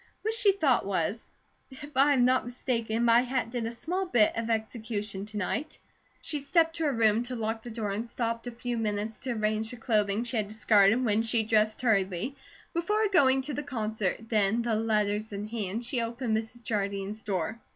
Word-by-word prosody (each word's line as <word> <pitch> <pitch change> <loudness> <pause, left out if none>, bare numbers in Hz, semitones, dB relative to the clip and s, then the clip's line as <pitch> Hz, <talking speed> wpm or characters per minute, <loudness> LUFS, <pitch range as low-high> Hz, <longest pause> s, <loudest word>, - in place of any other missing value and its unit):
What 440 +1 0
she 445 -3 +4
thought 295 -10 +2
was: 195 +3 -2 0.4
"If 285 +1 -11
I 280 +2 +5
am 250 -3 +4
not 255 0 +3
mistaken, 235 -2 -1
my 235 +1 +6
hat 250 -2 -2
did 240 -2 -2
a - - -4
small 360 +10 -3
bit 225 -10 +3
of 230 0 -2
execution 220 -3 -3
to 215 0 -7
night." 275 - -2 0.5
She 300 - -2
stepped 325 +3 +2
to 325 - 0
her 290 - +2
room 225 -2 +3
to 245 +1 -4
lock 225 -1 -2
the 240 - -8
door 220 -3 -3
and 220 +4 -3
stopped 230 0 -3
a - - -3
few 240 0 -4
minutes 215 0 -2
to 255 -2 -2
arrange 215 0 0
the 245 - -6
clothing 215 -2 +1
she 240 0 -2
had 210 -2 0
discarded 215 +2 +4
when 215 -1 +2
she 225 0 +2
dressed 215 +1 +1
hurriedly 200 +2 +1 0.4
before 420 +5 +1
going 270 -8 +4
to 295 +2 -2
the 295 - -2
concert, 220 -8 -2
then, 220 +1 +2
the 235 -1 0
letters 215 -1 0
in 200 0 -4
her 215 - -8
hand, 220 0 -3
she 245 0 -1
opened 230 0 -2
Mrs. 225 +2 -4
Jardine's 200 -1 -2
door. 200 +2 -2
230 Hz, 205 wpm, -28 LUFS, 215-255 Hz, 0.5 s, my